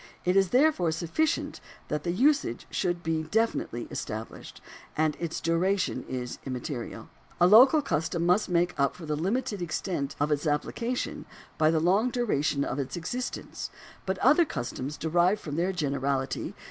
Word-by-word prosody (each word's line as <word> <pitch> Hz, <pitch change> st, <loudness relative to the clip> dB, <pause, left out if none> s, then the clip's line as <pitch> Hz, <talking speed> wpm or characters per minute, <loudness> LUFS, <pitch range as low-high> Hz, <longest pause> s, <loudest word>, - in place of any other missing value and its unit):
It 180 Hz, +1 st, +2 dB
is 195 Hz, -2 st, +4 dB
there 285 Hz, -, +5 dB, 0.2 s
sufficient 170 Hz, -, -1 dB, 0.3 s
that 150 Hz, 0 st, -2 dB
the 170 Hz, -, 0 dB
usage 260 Hz, -, +2 dB
should 175 Hz, -2 st, -1 dB
be 160 Hz, -1 st, 0 dB
definitely 160 Hz, -, -1 dB
estab 110 Hz, +1 st, -4 dB
lished, -, -, -11 dB, 0.4 s
and 155 Hz, -1 st, +2 dB
its 170 Hz, -2 st, -3 dB
duration 185 Hz, +4 st, 0 dB
is 125 Hz, -1 st, -4 dB
immaterial. 125 Hz, -1 st, -5 dB, 0.3 s
A 175 Hz, -, +6 dB
local 260 Hz, -, +7 dB
custom 165 Hz, -, -1 dB
must 180 Hz, +4 st, +3 dB
make 175 Hz, 0 st, +2 dB
up 140 Hz, 0 st, +2 dB
for 170 Hz, -, -9 dB
the 150 Hz, -1 st, -1 dB
limited 200 Hz, -, -1 dB
extent 155 Hz, -4 st, -2 dB
of 145 Hz, +1 st, +1 dB
its 150 Hz, +2 st, 0 dB
application 230 Hz, +11 st, -2 dB, 0.3 s
by 155 Hz, 0 st, +5 dB
the 160 Hz, 0 st, +2 dB
long 195 Hz, +9 st, +3 dB
duration 155 Hz, -, 0 dB
of 135 Hz, -, -3 dB
its 140 Hz, +5 st, -3 dB
existence, 245 Hz, +10 st, -4 dB, 0.4 s
but 190 Hz, 0 st, 0 dB
other 295 Hz, +8 st, +6 dB
customs 140 Hz, -, -4 dB
derive 175 Hz, +5 st, +2 dB
from 145 Hz, -7 st, -6 dB
their 175 Hz, +4 st, +1 dB
vol, 140 Hz, -5 st, 0 dB
i. -, -, -5 dB
170 Hz, 160 wpm, -28 LUFS, 150-200 Hz, 0.4 s, local